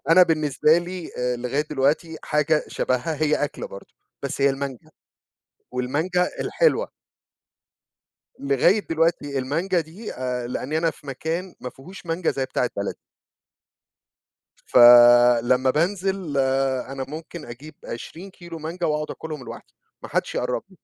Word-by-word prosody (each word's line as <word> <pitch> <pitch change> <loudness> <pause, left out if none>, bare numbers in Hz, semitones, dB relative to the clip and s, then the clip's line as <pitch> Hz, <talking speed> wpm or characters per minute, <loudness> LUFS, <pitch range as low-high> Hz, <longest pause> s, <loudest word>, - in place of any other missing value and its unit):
أنا 185 +2 +8
بالنسبة 155 -1 +3
لي، 175 0 -6
آآ، 125 0 0
لغاية 125 +5 -1
دلوقتي 150 +4 0
حاجة 150 +1 +1
شبهها، 145 +5 -1
هي 155 -1 +3
أكلة 145 - -6
برضو، 100 0 -12 0.3
بس 140 0 -4
هي 140 0 +5
المانجا، 135 -2 -6 0.8
والمانجا 155 +9 0
الحلوة. - - +1 1.5
لغاية 140 - +3
دلوقتي 160 -4 +1
المانجا 165 +8 0
دي، 170 +8 -8
آآ، 125 -1 -3
لأني 135 +5 -2
أنا 165 0 +1
في 145 - -17
مكان 165 +7 -4
ما 125 - -6
فيهوش 175 +6 -13
مانجا 165 +1 0
زي 135 - -2
بتاعة - - -1
بلدي. - - -3 1.7
فلمّا 120 +1 +7
بانزل، 185 0 -1 0.5
أنا 135 -1 -4
ممكن 160 +2 -8
أجيب 135 +6 -10
20 170 +11 -8
كيلو 170 -3 -10
مانجا 170 +3 -3
وأقعد 150 0 -1
آكلهم 155 -5 -7
لوحدي، - - -11 0.3
ما - - -8
حدش - - -1
يقرب 125 0 -1
لي. 190 - -19
150 Hz, 130 wpm, -23 LUFS, 130-170 Hz, 1.7 s, أنا